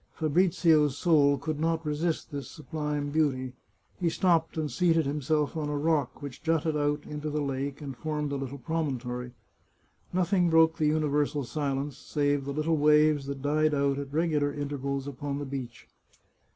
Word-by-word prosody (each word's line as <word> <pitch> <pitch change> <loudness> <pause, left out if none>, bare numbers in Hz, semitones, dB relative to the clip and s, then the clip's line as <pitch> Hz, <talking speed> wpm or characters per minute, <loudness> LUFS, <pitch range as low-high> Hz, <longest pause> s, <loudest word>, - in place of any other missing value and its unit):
Fabrizio's 160 -3 +3
soul 145 -5 +4
could 150 +2 -4
not 165 0 0
resist 155 +3 -1
this 140 -1 -5
sublime 150 -2 -4
beauty; 135 -5 0 0.5
he 175 -3 +2
stopped 165 -1 +1
and 155 -2 -1
seated 165 -3 +2
himself 150 +2 0
on 150 -2 -2
a 145 - -1
rock 145 -3 0
which 140 -3 -7
jutted 160 -1 +1
out 145 0 0
into 150 +1 -5
the 150 0 -1
lake 140 0 -3
and 140 -3 -6
formed 150 +1 -3
a - - -1
i6i - - -3
The 135 - -2
Chartreuse 140 +2 -9
of - - -30
Parma 160 -1 0
little - - -3
promontory. 125 0 -5 0.8
Nothing 180 0 +2
broke 160 0 +5
the 155 - +3
universal 150 -1 +1
silence, 140 0 -3
save 145 -2 0
the 140 - -3
little 155 +3 0
waves 150 -1 +4
that 140 -1 -5
died 155 +1 +2
out 140 0 +1
at 140 -1 -6
regular 150 -2 +1
intervals 140 -1 -3
upon 140 +1 -4
the 145 - -4
beach. 130 -4 -7
150 Hz, 180 wpm, -28 LUFS, 140-160 Hz, 0.8 s, broke